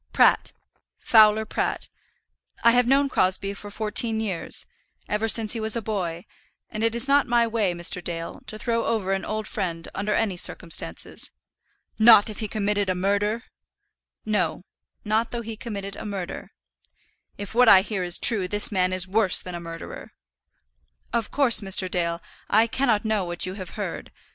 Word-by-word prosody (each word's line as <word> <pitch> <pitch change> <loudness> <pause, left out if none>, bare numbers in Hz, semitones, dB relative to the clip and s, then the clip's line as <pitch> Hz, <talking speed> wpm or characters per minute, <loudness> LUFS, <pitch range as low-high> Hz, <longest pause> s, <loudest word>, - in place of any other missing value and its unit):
"Pratt; - - +4 0.5
Fowler 220 -1 +4
Pratt. - - -3 0.8
I 235 - +6
have 245 0 +3
known 275 +2 +3
Crosbie 195 -4 +1
for 205 +1 -9
fourteen 220 +2 0
years, 200 -6 -4 0.4
ever 210 +2 -1
since 220 -1 +4
he 230 - -3
was 220 +1 +2
a - - 0
boy; 180 -5 -4 0.5
and 215 0 -4
it 230 0 +1
is 235 +3 +1
not 280 +1 +3
my 240 -1 +3
way, 220 -5 -1
Mr. 175 +1 0
Dale, 165 -1 -6
to 215 0 -6
throw 230 +1 -1
over 210 -4 -1
an 195 - -2
old 215 0 -4
friend 170 -4 -4
under 205 +1 -2
any 205 -5 -1
circumstances." 160 - -2 0.7
"Not 220 -1 +7
if 210 - -10
he 215 - -3
committed 205 -2 -1
a 185 - 0
murder." 205 +5 -1 0.8
"No; 185 -6 -1 0.4
not 220 +2 0
though 235 -1 -5
he 225 0 -7
committed 200 -3 -7
a - - -8
murder." 195 -4 -6 0.9
"If 205 +1 -7
what 245 0 +5
I 190 - +8
hear 210 -2 -3
is 175 -1 -1
true, 205 -6 +4
this 205 +3 +4
man 185 -2 +1
is 185 0 -1
worse 200 -1 +3
than 180 - -7
a 175 - -5
murderer." 165 -1 -9 1.0
"Of 230 -2 -1
course, 270 -6 +3
Mr. 195 -1 +2
Dale, 170 -2 -2 0.3
I 220 +2 +4
cannot 230 -2 0
know 215 -2 0
what 175 0 -3
you 185 - -5
have 185 -2 -9
heard. - - -6
210 Hz, 175 wpm, -24 LUFS, 185-225 Hz, 1.0 s, I